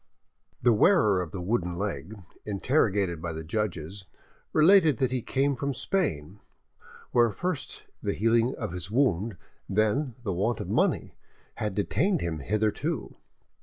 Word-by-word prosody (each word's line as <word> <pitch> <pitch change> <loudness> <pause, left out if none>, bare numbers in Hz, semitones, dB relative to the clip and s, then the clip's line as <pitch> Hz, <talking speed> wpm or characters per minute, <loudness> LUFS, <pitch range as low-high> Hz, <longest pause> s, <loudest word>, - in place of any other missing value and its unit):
The 120 -1 +5
wearer 105 - +4
of 90 - -5
the 95 - -6
wooden 90 -4 -1
leg, 100 +1 -4 0.3
interrogated 100 - +1
by 85 -1 -4
the 80 0 -6
judges, 95 0 -3 0.4
related 160 - +5
that 130 0 +1
he 130 -1 -1
came 140 +4 0
from 140 +1 -2
Spain, 100 - -1 0.7
where 120 -1 +4
first 175 - -4 0.2
the - - -1
healing 115 +4 +2
of 105 -6 -4
his 90 +1 -6
wound, 110 -5 +1 0.3
and 95 - -5
then 120 +4 +1
the 100 -5 -1
want 105 +6 0
of - - -5
money, - - +1 0.4
had 105 -3 -2
detained 175 - +1
him 80 -2 -2
hitherto. 110 - -1
110 Hz, 145 wpm, -27 LUFS, 95-130 Hz, 0.7 s, The